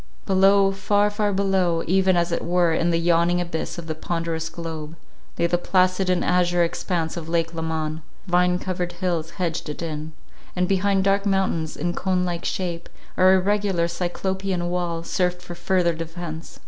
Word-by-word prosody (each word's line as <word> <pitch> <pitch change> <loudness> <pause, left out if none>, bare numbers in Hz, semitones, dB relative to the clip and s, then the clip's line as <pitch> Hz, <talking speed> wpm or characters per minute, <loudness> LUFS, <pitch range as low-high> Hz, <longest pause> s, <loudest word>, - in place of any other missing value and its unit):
Below, 195 0 +4
far, 205 +1 +1
far 205 0 0
below, 190 -4 +1
even 185 0 +3
as 170 0 +1
it 170 - -1
were 175 -1 +2
in 170 +1 +1
the 165 - +2
yawning 170 +1 +2
abyss 170 -2 -3
of 170 - -6
the 160 - -3
ponderous 165 0 -3
globe, 160 -2 -6 0.4
lay 170 - +2
the 175 0 +1
placid 185 +1 +2
and 180 -1 +1
azure 175 -1 +3
expanse 170 -1 -2
of 165 -1 -6
lake 165 0 0
Leman; 160 -1 -3 0.2
vine 180 -1 +3
covered 180 -1 -3
hills 175 -3 -2
hedged 170 -3 -2
it 150 - -5
in, 155 -1 -5 0.4
and 180 0 +1
behind 195 0 +2
dark 200 +1 +2
mountains 190 -5 0
in 175 +3 -1
cone 185 -1 0
like 175 -1 -3
shape, 175 -2 -3 0.3
or 185 +1 +6
irregular 195 -2 +1
cyclopean 180 +1 -2
wall, 170 -2 -2
served 180 +1 0
for 180 -1 -9
further 175 0 +1
defence. 165 0 -7
175 Hz, 170 wpm, -23 LUFS, 165-185 Hz, 0.4 s, or